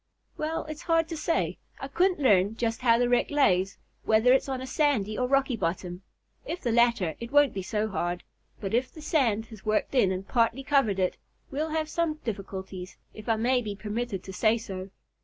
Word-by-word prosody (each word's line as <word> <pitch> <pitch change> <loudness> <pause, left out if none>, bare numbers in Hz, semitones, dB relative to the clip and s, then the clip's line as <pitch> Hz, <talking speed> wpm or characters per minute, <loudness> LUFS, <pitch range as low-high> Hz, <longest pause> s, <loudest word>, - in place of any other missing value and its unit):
"Well, 315 +1 -3
it's 310 +1 -7
hard 330 -1 +2
to 330 - -4
say. 325 +2 -1 0.2
I 270 - -5
couldn't 360 +5 +1
learn 205 -6 +3
just 230 0 -1
how 230 -2 +5
the 245 0 +2
wreck 245 0 +2
lays, 195 -10 +2 0.3
whether 220 +3 +4
it's 270 - +2
on 260 -1 -2
a 260 - -5
sandy 260 -8 +1
or 250 - 0
a - - -4
rocky 275 -2 +2
bottom. 180 -1 -3 0.4
If 355 -7 -5
the 240 - 0
latter, 230 -8 +3
it 235 0 -7
won't 290 -1 +5
be 195 - -3
so 210 +3 -1
hard, 175 -3 -2 0.4
but 195 0 -4
if 250 +3 +1
the 310 - -11
sand 235 -9 +1
has 215 -3 -11
worked 215 +3 0
in 225 -8 +4
and 190 +1 -4
partly 235 +2 +1
covered 270 -8 +2
it, 185 -1 0 0.3
we'll 300 +3 -2
have 315 0 -1
some 325 0 -1
difficulties, 190 -3 -6 0.2
if 215 +1 -9
I 225 - +4
may 245 +3 +2
be 210 -3 -5
permitted 210 -1 -4
to 190 - -8
say 220 +3 +3
so. 190 -4 -7
235 Hz, 210 wpm, -27 LUFS, 200-275 Hz, 0.4 s, how